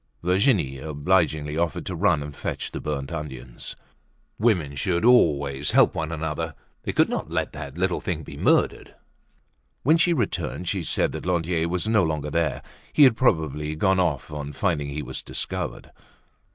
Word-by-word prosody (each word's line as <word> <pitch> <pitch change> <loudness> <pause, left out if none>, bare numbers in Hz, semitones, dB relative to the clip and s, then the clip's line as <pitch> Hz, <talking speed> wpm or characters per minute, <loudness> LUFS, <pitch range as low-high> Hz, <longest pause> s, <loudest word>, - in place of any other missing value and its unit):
Virginie 90 - +2
obligingly 75 0 0
offered 85 -3 -1
to 90 - -3
run 85 -4 +2
and 75 -1 -8
fetch - - -4
the - - -5
burnt 70 -3 -3
onions. 65 -6 -6 0.6
Women 90 -11 +2
should 85 +7 0
always 70 - +4
help - - +5
one 80 0 -3
another, 80 0 -3 0.3
they - - -3
could - - +3
not - - -3
let - - -2
that 70 0 -7
little 90 0 0
thing 80 -3 -3
be - - -9
murdered. - - +1 0.9
When 155 +5 +5
she 170 +1 +3
returned 105 - -2
she 95 +1 0
said 80 - 0
that - - -6
Lantier 85 -1 0
was 90 +4 -1
no 110 -3 +4
longer 75 -2 -2
there; 85 0 0 0.3
he 150 - +6
had 130 -4 +7
probably 80 - +1
gone 95 +4 +2
off 80 -8 0
on 75 -1 -5
finding 75 -3 0
he 75 +1 -4
was 65 0 -5
discovered. - - -4
80 Hz, 165 wpm, -25 LUFS, 75-90 Hz, 0.9 s, had